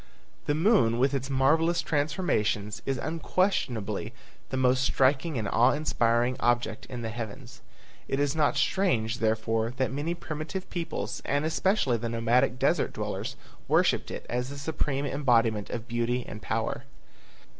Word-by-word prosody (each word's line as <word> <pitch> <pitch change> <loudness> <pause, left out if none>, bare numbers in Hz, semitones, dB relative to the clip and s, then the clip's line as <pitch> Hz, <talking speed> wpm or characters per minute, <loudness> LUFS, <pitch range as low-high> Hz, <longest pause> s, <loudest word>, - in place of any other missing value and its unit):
The 145 - +2
moon 160 - +3
with 135 +3 +2
its 135 0 -2
marvelous 160 +6 +3
transformations 140 - 0
is 135 -1 0
unquestionably 155 - -1 0.4
the 130 - -2
most 130 0 +3
striking 135 +3 +2
and 110 -3 -2
awe 120 +5 +4
inspiring 120 -4 +1
object 120 -2 0
in 120 -2 -6
the 115 - -3
heavens. 120 +3 -7 0.5
It 135 - -1
is 145 +1 +1
not 150 -2 +2
strange, 120 - +1
therefore, 110 +1 0
that 130 -2 0
many 155 +5 -2
primitive 160 +3 -5
peoples 175 -2 -4
and 145 +2 0
especially 160 - +1
the 115 +1 -3
nomadic 115 +2 +2
desert - - +1
dwellers - - -4 0.3
worshipped - - +2
it - - -6
as 125 +1 -2
the 140 - -7
supreme 145 -1 -2
embodiment 115 -7 +2
of 115 -1 -5
beauty 120 +1 -1
and 105 - -8
power. 115 +4 -2
130 Hz, 145 wpm, -28 LUFS, 115-150 Hz, 0.5 s, awe